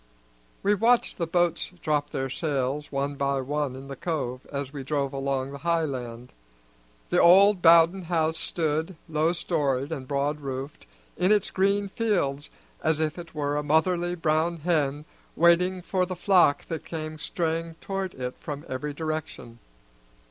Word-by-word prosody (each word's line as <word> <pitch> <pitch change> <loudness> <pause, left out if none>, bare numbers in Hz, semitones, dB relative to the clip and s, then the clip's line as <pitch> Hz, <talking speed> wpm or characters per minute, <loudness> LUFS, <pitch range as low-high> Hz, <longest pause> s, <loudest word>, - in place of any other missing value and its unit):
We 205 - +4
watched 230 +3 +2
the 170 - 0
boats 175 0 +1
drop 150 -1 0
their 135 0 -2
sails 145 -1 -2
one 140 +1 -1
by 140 -1 0
one 145 0 -2
in 135 +1 -9
the 135 - -6
cove 130 -5 -3
as 140 -1 -4
we 140 -2 -5
drove 140 0 -1
along 135 -1 -2
the 140 - -8
high 170 0 +1
land. 125 -3 -6 0.8
The - - +4
old 195 +2 +7
Bowden 170 +2 +6
house 160 -1 0
stood, 160 +2 -1
low 160 +1 +1
storied 145 -5 -1
and 135 -5 -5
broad 145 +2 -1
roofed, 135 0 -6 0.3
in 185 +2 +2
its 210 -2 +2
green 200 +1 +1
fields 175 -10 -1 0.3
as 155 -1 +2
if 155 +2 -1
it 170 -2 -10
were 145 -1 -1
a - - +1
motherly 175 +4 +1
brown 165 +1 +1
hen 150 -3 0 0.3
waiting 180 +2 +3
for 185 0 0
the 185 - -4
flock 180 -5 +3
that 165 - -5
came 155 -1 -6
straying 165 0 -2
toward 195 -1 -4
it 125 -1 -4
from 145 -1 -6
every 145 +3 -4
direction. 155 -7 -5
155 Hz, 160 wpm, -26 LUFS, 140-175 Hz, 0.8 s, old